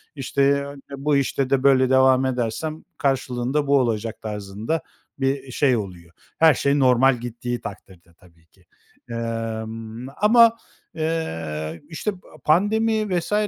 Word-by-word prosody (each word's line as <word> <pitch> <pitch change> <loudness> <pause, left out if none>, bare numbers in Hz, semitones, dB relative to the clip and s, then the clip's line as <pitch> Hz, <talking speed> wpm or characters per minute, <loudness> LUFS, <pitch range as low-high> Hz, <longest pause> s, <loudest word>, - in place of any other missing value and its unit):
İşte, 140 +1 +1
ı - - -11 0.2
bu 145 +1 +1
işte 135 -1 0
de 135 -1 +1
böyle 130 -2 +5
devam 130 0 +4
edersem 130 +5 -2
karşılığında 135 0 -1
bu 140 0 +4
olacak 115 -3 -2
tarzında 105 +7 -4 0.4
bir 135 0 -1
şey 130 -1 +2
oluyor. 90 -5 -7 0.3
Her 160 -1 +7
şey 140 +2 +1
normal 130 0 +4
gittiği 120 +1 -5
takdirde 90 -4 -11
tabii 85 -1 -24
ki. - - -29 0.4
Emm, 115 0 -5
ama, 230 +2 +6 0.4
eee, 80 - -3
işte, 170 +6 -2
pa 190 -1 -15 0.2
pandemi 210 +3 +2
vs. 170 - -5
130 Hz, 130 wpm, -23 LUFS, 110-145 Hz, 0.4 s, Her